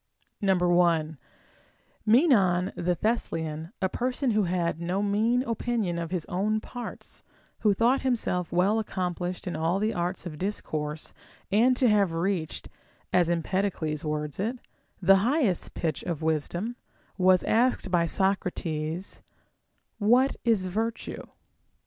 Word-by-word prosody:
1. 175 -5 +2 0.9
Menon 205 - +4
the 175 0 0
Thessalian, 160 -6 -2
a - - +4
person 250 +5 -1
who 210 -2 +2
had 170 -2 -1
no 180 +4 -1
mean 220 +5 +2
opinion 230 -7 -1
of 165 -1 -4
his 180 -3 -2
own 210 +4 0
parts, 245 +2 -9 0.4
who 210 - +3
thought 235 +7 +2
himself 220 -9 -1
well 200 +6 +2
accom 180 -4 -3
plished 180 +1 -4
in 180 - -3
all 165 +4 +1
the 215 +2 0
arts 175 +2 -3
of 155 -4 -7
discourse 155 -6 -3 0.4
and 240 +5 +4
to 255 - +3
have 200 -5 +3
reached 170 -1 -2 0.5
(as 175 -2 +4
Empedocles 170 -3 -1
words 150 0 -3
it) 225 +6 -1 0.5
the 195 +2 +7
highest 230 - +1
pitch 160 -2 -2
of 165 -3 -4
wisdom, 175 +9 -1 0.4
was 185 0 +5
asked 235 -4 +1
by 170 -2 +3
Socrates, 175 -3 -2 0.8
What 245 +6 +4
is 225 -5 +2
virtue? 220 +5 -3
185 Hz, 130 wpm, -27 LUFS, 170-220 Hz, 0.9 s, the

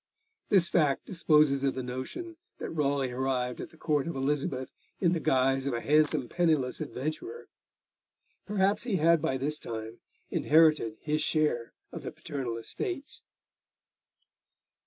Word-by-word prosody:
This 190 -5 +5
fact 150 -6 +2
disposes 150 -6 +3
of 135 - +1
the 130 - -3
notion 225 - -6 0.2
that - - -5
Raleigh 140 -4 0
arrived 125 -1 -1
at - - -7
the 165 - -19
Court 150 -3 0
of 170 - -3
Elizabeth 135 -1 -1 0.3
in 175 -3 +3
the 175 - +1
guise 135 -2 +2
of 130 - 0
a - - -1
handsome 150 -1 +2
penniless 155 -5 +1
adventurer. 155 - -5 1.0
Perhaps 200 0 +2
he 230 -6 0
had 165 -1 +4
by 135 -4 0
this 150 +3 -3
time 110 0 -6 0.3
inherited 155 -8 +4
his 155 0 0
share 150 -7 0 0.2
of - - -7
the - - -6
paternal 125 -5 -4
estates. 290 - -5
150 Hz, 140 wpm, -29 LUFS, 130-165 Hz, 1.0 s, This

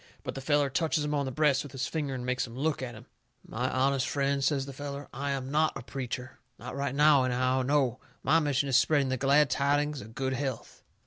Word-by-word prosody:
But - - -4
the 135 - -6
feller 145 0 +2
touches 155 +1 0
him 150 - -2
on 140 -1 0
the - - -3
breast 145 -1 +2
with 145 -1 -9
his 135 -1 -2
finger, 145 -4 -3
and 125 -1 -5
makes 125 +1 -1
him 115 +1 -10
look 150 +1 0
at 120 -3 -5
him. 110 - -12 0.4
"My 125 +3 -2
honest 135 0 +1
friend," 140 -1 0
says 135 -1 +1
the 140 - -8
feller, 140 0 -6
"I 140 +3 -3
am 135 -1 -3
NOT 155 0 +2
a 120 - -8
preacher. 130 0 -6 0.2
Not - - -8
right 140 -1 -2
now, 145 -2 +5
anyhow. 130 +1 +1
No! 130 -2 +1 0.2
My 160 +4 +4
mission 145 -2 0
is 135 - +1
spreading 135 +1 +3
the 130 - 0
glad 140 +2 +4
tidings 145 +1 +1
of 110 +2 -12
good 130 -1 -1
health. 135 0 -4
135 Hz, 235 wpm, -29 LUFS, 130-145 Hz, 0.4 s, now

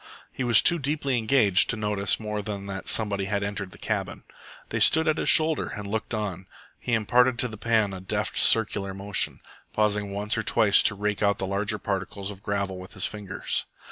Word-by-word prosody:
He 130 - -5
was 120 -2 +4
too 170 -1 +4
deeply 140 -3 -1
engaged 110 -5 +3
to 120 - -1
notice 105 -2 +1
more 105 -1 -4
than 100 -1 -6
that 95 -1 -7
somebody 100 -3 0
had 100 +1 -2
entered 100 -1 -4
the - - -14
cabin. - - -4 0.5
They - - -2
stood 160 +1 +4
at 155 0 +1
his - - 0
shoulder 160 0 +4
and 105 - -7
looked 110 +3 -3
on. 95 -4 -5 0.3
He 120 - -4
imparted 120 +3 +2
to 125 - +2
the 110 - -9
pan 110 -2 0
a 95 - -8
deft 95 - -3
circular 100 -3 +3
motion, 100 +1 +1 0.3
pausing 105 -1 0
once 105 +3 -2
or - - 0
twice 105 -1 +4
to 100 - +2
rake 105 0 -3
out 100 -1 +2
the 95 - -3
larger 100 +2 -2
particles 100 0 -4
of 100 -1 -12
gravel 100 -2 -3
with 95 - -12
his 95 - 0
fingers. 105 -3 -3
105 Hz, 205 wpm, -25 LUFS, 100-110 Hz, 0.5 s, was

